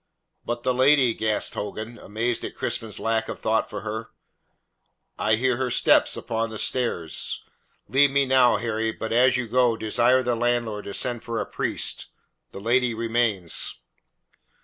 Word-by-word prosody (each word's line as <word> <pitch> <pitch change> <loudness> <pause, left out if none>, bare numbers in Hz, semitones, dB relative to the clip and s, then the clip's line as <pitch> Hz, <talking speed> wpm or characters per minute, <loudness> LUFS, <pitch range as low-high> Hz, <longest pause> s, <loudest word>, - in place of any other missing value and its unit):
"But 120 0 -4
the 130 - +1
lady?" 130 -1 +4
gasped 110 -1 -1
Hogan, 110 +3 -6
amazed 115 +3 -2
at - - -6
Crispin's 110 -2 -3
lack 110 0 -1
of - - -5
thought 110 0 0
for - - -6
her. 110 +1 -5 1.1
"I 110 0 +3
hear 125 +2 0
her 130 0 -1
step - - +4
upon 115 0 -2
the 110 - -7
stairs. 105 -11 -1 0.4
Leave 140 +6 +4
me 140 0 +2
now, 130 -2 +4
Harry, 110 -1 -2
but 110 0 -5
as 125 +2 +4
you 125 -2 -3
go, 120 0 +2
desire 120 +4 +2
the 120 0 0
landlord 120 -3 -1
to 100 - -4
send 120 -2 -1
for 115 -1 -3
a - - -2
priest. - - -1 0.4
The - - -8
lady 120 +2 +1
remains." 115 -6 0
115 Hz, 160 wpm, -24 LUFS, 110-125 Hz, 1.1 s, lady